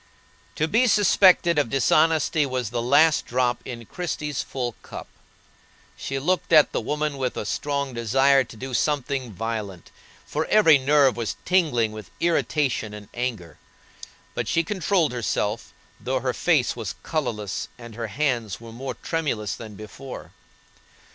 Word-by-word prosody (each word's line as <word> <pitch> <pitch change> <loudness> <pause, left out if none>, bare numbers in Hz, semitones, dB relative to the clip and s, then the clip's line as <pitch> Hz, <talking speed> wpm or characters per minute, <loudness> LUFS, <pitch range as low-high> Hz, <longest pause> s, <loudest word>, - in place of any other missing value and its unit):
To 155 - 0
be 230 +9 +3
suspected 185 -5 +5
of 140 - 0
dishonesty 155 +3 +3
was 130 -5 -2
the 120 -1 -1
last 155 +6 +4
drop 125 0 0
in 120 -2 -7
Christie's 150 - -3
full 125 -3 -3
cup. - - -8 0.9
She 135 - -4
looked 175 +7 -1
at 155 -3 +6
the - - -1
woman 150 +3 -2
with 130 -2 -2
a - - -3
strong 140 +5 -2
desire 135 +4 +3
to 115 - -13
do 130 +2 -6
something 135 -2 -1
violent, 105 -3 -5 0.3
for 155 +2 -2
every 165 -9 +6
nerve 140 -1 +4
was 115 -4 -3
tingling 150 -12 +2
with 110 -4 -9
irritation 145 -9 0
and 105 -1 -11
anger. 115 -9 -4 0.7
But - - -3
she 165 - +2
controlled 185 -3 +1
herself, 110 -2 -2 0.3
though 130 +3 -2
her 130 0 -1
face 150 -6 +2
was 105 -5 -5
colorless 115 - -3
and 120 -2 -11
her 115 +1 -4
hands 120 -6 -1
were 115 -1 -11
more 130 +4 -6
tremulous 135 - -2
than 110 -3 -9
before. 115 +6 -9
130 Hz, 150 wpm, -24 LUFS, 115-150 Hz, 0.9 s, at